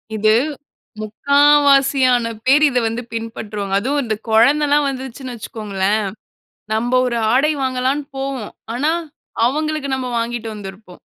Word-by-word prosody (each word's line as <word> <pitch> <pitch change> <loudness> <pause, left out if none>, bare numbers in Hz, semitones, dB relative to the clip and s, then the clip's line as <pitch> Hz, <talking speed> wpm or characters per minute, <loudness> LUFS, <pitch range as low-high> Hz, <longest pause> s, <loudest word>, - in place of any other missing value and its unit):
இது 215 0 +3 0.7
3/4 220 +7 -1 0.3
வாசியான 270 -3 +4 0.2
பேர் 280 +4 +5
இத 250 - -2
வந்து 230 +2 -3
பின்பற்றுவாங்க. 215 -3 -5
அதுவும் 285 +6 -1
இந்த 220 -2 -2
குழந்தல்லா 285 +6 +4
வந்துருச்சுன்னு 260 -1 -6
வச்சுக்கோங்களேன், 210 -2 -2 0.7
நம்ம 235 +3 -1
ஒரு 235 -1 -1 0.2
ஆடை 300 +4 +3
வாங்கலான்னு 260 +2 -1
போவோம். 270 -5 -4 0.2
ஆனா 295 +6 +1 0.5
அவுங்களுக்கு 305 +2 -1
நம்ம 260 -1 -4
வாங்கிட்டு 230 0 -3
வந்திருப்போம். 195 -2 -11
250 Hz, 120 wpm, -19 LUFS, 220-275 Hz, 0.7 s, பேர்